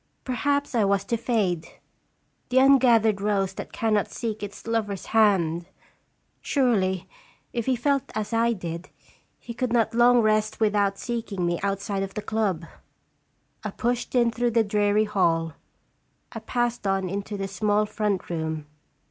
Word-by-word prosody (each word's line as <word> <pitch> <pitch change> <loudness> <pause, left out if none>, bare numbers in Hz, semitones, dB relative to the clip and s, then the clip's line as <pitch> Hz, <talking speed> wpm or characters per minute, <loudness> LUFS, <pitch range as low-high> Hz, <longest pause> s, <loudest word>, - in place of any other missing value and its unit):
Perhaps 280 +3 -1
I 230 -3 +3
was 200 0 +2
to 235 - 0
fade 205 -8 0 0.8
the 255 - +4
un 270 +1 +6
gathered 225 -5 +3
rose 200 -2 0
that - - -7
cannot 215 -3 0
seek 225 -3 -4
its 205 -1 -8
lover's 220 -4 -2
hand! 175 -6 +3 0.7
Surely, 195 - +1 0.5
if 235 -1 -2
he 260 - +3
felt 275 +2 0
as 215 0 -3
I 230 +1 +3
did, 170 -3 -6 0.5
he 235 - -8
could 245 0 -2
not 230 -1 +2
long 240 +1 +5
rest 215 0 +1
without 205 -2 +2
seeking 225 -6 -3
me 175 0 0
outside 200 0 -2
of 195 0 -5
the 210 - -4
club. 200 -7 -1 1.0
I - - -2
pushed 245 +1 -2
in 235 -2 +4
through 240 +1 0
the 225 - +5
dreary 210 0 +2
hall. 165 -6 +1 0.8
I - - -6
passed 240 -3 -2
on 195 -1 0
into 200 +2 -4
the 195 0 -3
small 205 +2 +1
front 210 -3 -2
room. 160 -2 -3
210 Hz, 155 wpm, -25 LUFS, 195-235 Hz, 1.0 s, un